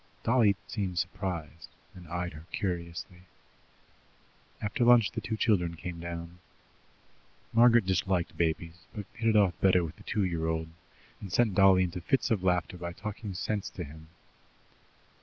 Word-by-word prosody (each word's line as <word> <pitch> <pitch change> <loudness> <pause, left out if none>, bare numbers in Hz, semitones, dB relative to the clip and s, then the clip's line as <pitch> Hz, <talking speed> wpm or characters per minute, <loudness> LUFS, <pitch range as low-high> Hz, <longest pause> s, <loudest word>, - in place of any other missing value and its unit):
Dolly 115 -4 +4
seemed 95 -5 -3
surprised, 85 -3 -4 0.2
and 90 -2 -12
eyed 90 +2 -3
her 75 +2 -12
curiously. 85 -2 -4 1.4
After 105 +5 -1
lunch 120 -3 +6
the - - -4
two 110 - -3
children 90 -7 +2
came 85 +1 -6
down. 85 +1 -7 1.1
Margaret 120 -2 +6
disliked 95 -1 0
babies, 85 0 -2
but 105 -2 -5
hit 115 -1 0
it 110 - +2
off 100 -4 +5
better 90 -2 +5
with 80 0 -6
the - - -15
two 105 -3 0
year 85 -3 -1
old, 80 0 -2 0.5
and 100 - -8
sent 110 +2 +3
Dolly 95 -1 +6
into 90 0 -3
fits 130 +9 +1
of 100 -5 +1
laughter 90 -1 +1
by 85 0 -5
talking 105 0 -6
sense 105 +2 -2
to 90 - -6
him. 80 +1 -11
90 Hz, 155 wpm, -30 LUFS, 85-105 Hz, 1.4 s, lunch